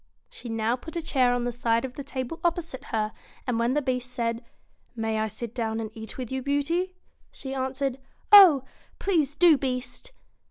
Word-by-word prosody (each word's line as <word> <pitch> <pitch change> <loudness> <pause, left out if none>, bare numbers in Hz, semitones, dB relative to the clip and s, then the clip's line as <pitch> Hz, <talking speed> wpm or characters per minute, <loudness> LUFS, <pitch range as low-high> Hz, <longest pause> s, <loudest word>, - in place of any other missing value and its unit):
She 240 - -9
now 225 +1 0
put 320 +7 -10
a 340 - -1
chair 260 -5 +3
on 245 0 0
the 245 - -1
side 230 0 +1
of 255 - -7
the 280 - -7
table 265 +3 -5
op 345 -1 +3
posite 330 -7 -7
her, 215 -1 -1 0.3
and 245 -3 0
when 235 +3 +1
the 295 - +1
Beast 250 -1 -2
said, 230 0 -2 0.5
'May 225 -1 -1
I 220 - 0
sit 230 +2 -7
down 225 -2 -2
and 220 -1 -4
eat 220 -2 -8
with 255 -2 -5
you, 265 0 -2
Beauty?' 315 +7 0 0.3
she 265 -1 -7
answered, 265 0 -2 0.2
' - - -37
Oh! 300 -9 +6 0.3
please 310 -8 +1
do, 335 -4 +6
Beast 260 - -4
255 Hz, 200 wpm, -26 LUFS, 230-285 Hz, 0.5 s, Oh